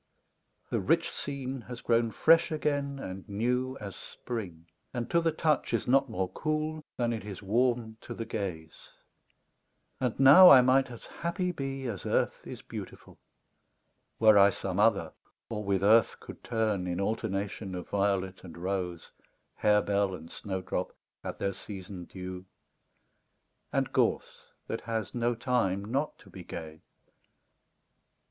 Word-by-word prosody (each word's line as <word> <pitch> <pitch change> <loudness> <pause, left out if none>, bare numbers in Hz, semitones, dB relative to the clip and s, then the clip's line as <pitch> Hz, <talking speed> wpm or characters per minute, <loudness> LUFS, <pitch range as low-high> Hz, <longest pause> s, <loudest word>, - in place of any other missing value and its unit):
The - - +1
rich - - +1
scene 135 -2 -4
has 120 -2 -6
grown 115 -1 +2
fresh 165 +10 +4
again 145 -2 -1
and 95 -5 -7
new 125 +5 -1
As 100 -3 -7
Spring 95 -9 -7 0.3
and 120 -1 -2
to 170 - +4
the 165 -1 +2
touch 155 -5 +1
is 110 - -2
not 135 +2 +4
more 95 0 -1
cool 155 0 -2
Than 120 -1 +1
it 110 - -4
is 105 -1 -8
warm 115 +1 +1
to 120 - -7
the 115 - -4
gaze; 85 -8 -6 1.1
and 125 -2 -1
now 145 +8 +10
I 130 -2 +10
might 130 +1 +3
As 120 -2 -10
happy 180 +2 -2
be 135 -4 -4
as 110 -6 -4
earth - - 0
is - - -8
beautiful, - - -9 1.0
Were 110 -2 +7
I 100 0 +8
some 95 -1 -3
other 100 -7 +3 0.4
or 105 -1 -3
with 100 -1 0
earth 110 +3 +5
could - - -11
turn 110 -5 0
In 90 0 -2
alternation 100 -1 -2
of 90 - -6
violet 95 -2 -1
and 90 -3 -10
rose, 90 -1 -3 0.5
Harebell 100 -2 +2
and 80 -1 -11
snowdrop, 95 -2 -4 0.3
at - - -5
their 100 0 -1
season 95 -2 -8
due, 90 0 -8 1.3
And - - -1
gorse - - 0 0.2
that - - -4
has 115 -2 -3
no 120 0 0
time 115 -6 0
not 135 +7 -2
to - - -18
be - - -9
gay. 80 -1 -8
110 Hz, 145 wpm, -29 LUFS, 95-130 Hz, 1.3 s, now